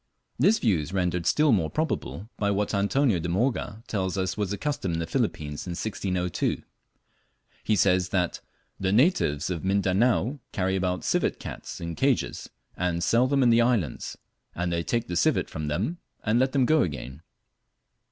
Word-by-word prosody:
This 200 Hz, -, +5 dB
view 100 Hz, -9 st, +2 dB
is 75 Hz, +4 st, -6 dB
rendered 90 Hz, -2 st, 0 dB
still 150 Hz, -1 st, +4 dB
more 90 Hz, -8 st, +2 dB
probable 155 Hz, -9 st, -3 dB
by 105 Hz, -, 0 dB
what 100 Hz, +1 st, 0 dB
Antonio 100 Hz, +1 st, +2 dB
de 85 Hz, +1 st, -3 dB
Morga 110 Hz, +2 st, -1 dB
tells 95 Hz, -3 st, -2 dB
us 95 Hz, -1 st, -1 dB
was 105 Hz, -3 st, -1 dB
the 100 Hz, -, -2 dB
custom 140 Hz, -, -2 dB
in -, -, -1 dB
the 85 Hz, -, -1 dB
Philippines 75 Hz, 0 st, -2 dB
in 90 Hz, -, -3 dB
1602. 90 Hz, -3 st, -2 dB, 1.0 s
He 110 Hz, -, +2 dB
says 90 Hz, -1 st, +3 dB
that 90 Hz, -2 st, -1 dB, 0.4 s
"the 95 Hz, -1 st, 0 dB
natives 105 Hz, -, +2 dB
of 85 Hz, -3 st, -3 dB
Mindanao 100 Hz, +7 st, +2 dB
carry 95 Hz, 0 st, 0 dB
about 90 Hz, -1 st, -1 dB
civet -, -, 0 dB
cats -, -, -7 dB
in 85 Hz, -1 st, -4 dB
cages, 135 Hz, -, 0 dB, 0.3 s
and 85 Hz, -1 st, -1 dB
sell 120 Hz, +6 st, +3 dB
them 135 Hz, 0 st, +2 dB
in 120 Hz, -, +5 dB
the 115 Hz, +1 st, +5 dB
islands; 115 Hz, -, 0 dB, 0.4 s
and 90 Hz, 0 st, -1 dB
they 85 Hz, -, 0 dB
take 115 Hz, +6 st, -1 dB
the 90 Hz, -, -3 dB
civet 90 Hz, -, +2 dB
from 75 Hz, -1 st, -4 dB
them, 105 Hz, -, -2 dB, 0.2 s
and 110 Hz, +2 st, +2 dB
let 130 Hz, +1 st, +2 dB
them 135 Hz, -3 st, +3 dB
go 155 Hz, +3 st, +4 dB
again." 70 Hz, -3 st, -4 dB
95 Hz, 175 wpm, -26 LUFS, 90-120 Hz, 1.0 s, This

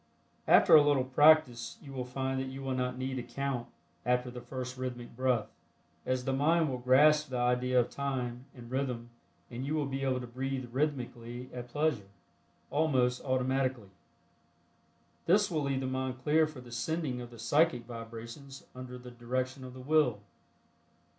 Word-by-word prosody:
After -, -, +6 dB
a 155 Hz, -, +11 dB
little 145 Hz, -3 st, +3 dB
practice 130 Hz, -2 st, +4 dB
you 140 Hz, -2 st, -11 dB
will 130 Hz, -2 st, -3 dB
find 130 Hz, +1 st, -2 dB
that 130 Hz, -, -3 dB
you 135 Hz, +1 st, -7 dB
will 135 Hz, -1 st, -1 dB
not 125 Hz, 0 st, -1 dB
need 130 Hz, 0 st, -3 dB
to -, -, -2 dB
count 125 Hz, 0 st, -3 dB, 0.4 s
after 125 Hz, 0 st, +1 dB
the 125 Hz, 0 st, -8 dB
first 130 Hz, 0 st, -6 dB
rhythmic 125 Hz, -2 st, -6 dB
breath, 125 Hz, -3 st, +1 dB, 0.6 s
as 130 Hz, -1 st, 0 dB
the 135 Hz, -, 0 dB
mind 155 Hz, +2 st, +3 dB
will 125 Hz, -, -3 dB
grasp 150 Hz, +5 st, +5 dB
the 130 Hz, -, -3 dB
idea 125 Hz, +1 st, +2 dB
of 120 Hz, -, 0 dB
time 130 Hz, -3 st, -3 dB
and 120 Hz, -1 st, -11 dB
rhythm 125 Hz, -3 st, -2 dB, 0.4 s
and 120 Hz, +2 st, -5 dB
you 145 Hz, +3 st, -1 dB
will 150 Hz, -2 st, 0 dB
be 135 Hz, 0 st, -3 dB
able 130 Hz, -1 st, +1 dB
to 125 Hz, -, -6 dB
breathe 130 Hz, +1 st, -4 dB
rhythmically 125 Hz, -3 st, -3 dB
at 125 Hz, -1 st, -6 dB
pleasure, 145 Hz, -7 st, 0 dB, 0.6 s
almost 130 Hz, -5 st, +2 dB
automatically. 130 Hz, -4 st, 0 dB, 1.4 s
This 195 Hz, +3 st, +4 dB
will 155 Hz, -3 st, 0 dB
leave 135 Hz, -2 st, -1 dB
the -, -, -2 dB
mind 130 Hz, 0 st, -2 dB
clear 155 Hz, +2 st, +4 dB
for 150 Hz, -4 st, -10 dB
the 120 Hz, -1 st, -13 dB
sending 130 Hz, +1 st, -2 dB
of 120 Hz, -, -8 dB
the 120 Hz, -, -13 dB
psychic 120 Hz, +1 st, +2 dB
vibrations 115 Hz, +4 st, -9 dB
under 125 Hz, 0 st, -8 dB
the 125 Hz, 0 st, -11 dB
direction 130 Hz, +2 st, -3 dB
of 130 Hz, 0 st, -9 dB
the 130 Hz, -, -9 dB
Will. 135 Hz, -6 st, +2 dB
130 Hz, 175 wpm, -31 LUFS, 125-140 Hz, 1.4 s, a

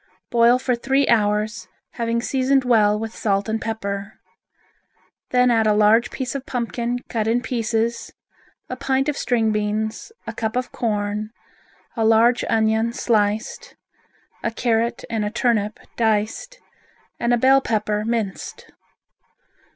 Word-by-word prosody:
Boil 235 Hz, +1 st, +5 dB
for 255 Hz, 0 st, -1 dB
three 270 Hz, +3 st, +1 dB
hours, 210 Hz, -3 st, +1 dB, 0.2 s
having 235 Hz, 0 st, -2 dB
seasoned 265 Hz, +1 st, +2 dB
well 215 Hz, -4 st, +3 dB
with 225 Hz, +1 st, -5 dB
salt 200 Hz, -1 st, 0 dB
and 220 Hz, 0 st, -2 dB
pepper. 200 Hz, -2 st, -4 dB, 1.2 s
Then 250 Hz, 0 st, +3 dB
add 225 Hz, -2 st, +3 dB
a 210 Hz, -, +3 dB
large 215 Hz, +3 st, +4 dB
piece 260 Hz, -1 st, -4 dB
of 275 Hz, -1 st, -6 dB
pumpkin 240 Hz, -1 st, -2 dB
cut 220 Hz, -2 st, -2 dB
in 230 Hz, +2 st, +2 dB
pieces, 230 Hz, -1 st, -1 dB, 0.6 s
a 255 Hz, -, -5 dB
pint 270 Hz, +1 st, 0 dB
of 295 Hz, -, -1 dB
string 230 Hz, -5 st, +1 dB
beans, 215 Hz, -, -2 dB
a -, -, -5 dB
cup 220 Hz, +1 st, -3 dB
of 250 Hz, 0 st, -2 dB
corn, 210 Hz, -1 st, -2 dB, 0.7 s
a 225 Hz, -, 0 dB
large 225 Hz, +2 st, +4 dB
onion 220 Hz, +1 st, +1 dB
sliced, 220 Hz, -, -1 dB, 0.7 s
a -, -, -1 dB
carrot 230 Hz, 0 st, -1 dB
and 225 Hz, -2 st, -2 dB
a 210 Hz, -, -1 dB
turnip 215 Hz, -2 st, 0 dB, 0.2 s
diced, 225 Hz, -, -1 dB, 0.6 s
and 235 Hz, -, 0 dB
a 240 Hz, -, +4 dB
bell 265 Hz, +3 st, +5 dB
pepper 210 Hz, -3 st, -1 dB
minced. 220 Hz, -4 st, -4 dB
225 Hz, 135 wpm, -22 LUFS, 215-245 Hz, 1.2 s, Boil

